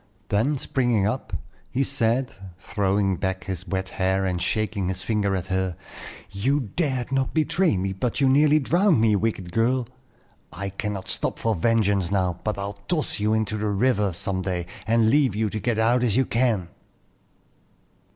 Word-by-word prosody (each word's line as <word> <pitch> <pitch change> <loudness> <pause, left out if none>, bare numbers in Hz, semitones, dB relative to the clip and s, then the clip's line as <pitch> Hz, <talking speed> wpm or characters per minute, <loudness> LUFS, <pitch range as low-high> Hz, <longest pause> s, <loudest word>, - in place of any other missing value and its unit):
Then, 115 +9 +2
springing 120 -6 +1
up, 110 0 -2 0.4
he 135 - 0
said, 130 -1 +1 0.3
throwing 100 -1 0
back 95 -2 -2
his 95 0 -5
wet 95 -1 -2
hair 95 +1 0
and 90 -2 -1
shaking 105 -2 -1
his 95 0 -4
finger 105 -3 0
at 95 -2 -3
her: 95 -2 -1 0.6
"You 120 +3 0
dared 130 -7 -1
not 135 +2 0
betray 160 - +2
me, 95 +1 -1
but 115 +7 -2
you 135 - +4
nearly 145 +3 +5
drowned 175 - +3
me, 110 -2 +4
wicked 100 -4 -2
girl. 120 +5 +1 0.7
I 100 +1 -5
cannot 100 -1 -4
stop - - -1
for 115 - 0
vengeance 100 -2 +1
now; 90 -3 0
but 110 -1 -1
I'll 100 0 -5
toss 160 -10 0
you 105 +1 +2
into 110 -1 -1
the 105 0 -2
river 105 -1 +2
some 95 +2 -3
day, 90 -2 -2 0.2
and 115 0 +3
leave 140 -7 +3
you 110 -1 0
to 110 - -3
get 120 0 -1
out 120 +2 +3
as 120 -3 +2
you 130 - +3
can." 115 -8 0
105 Hz, 170 wpm, -24 LUFS, 95-125 Hz, 0.7 s, nearly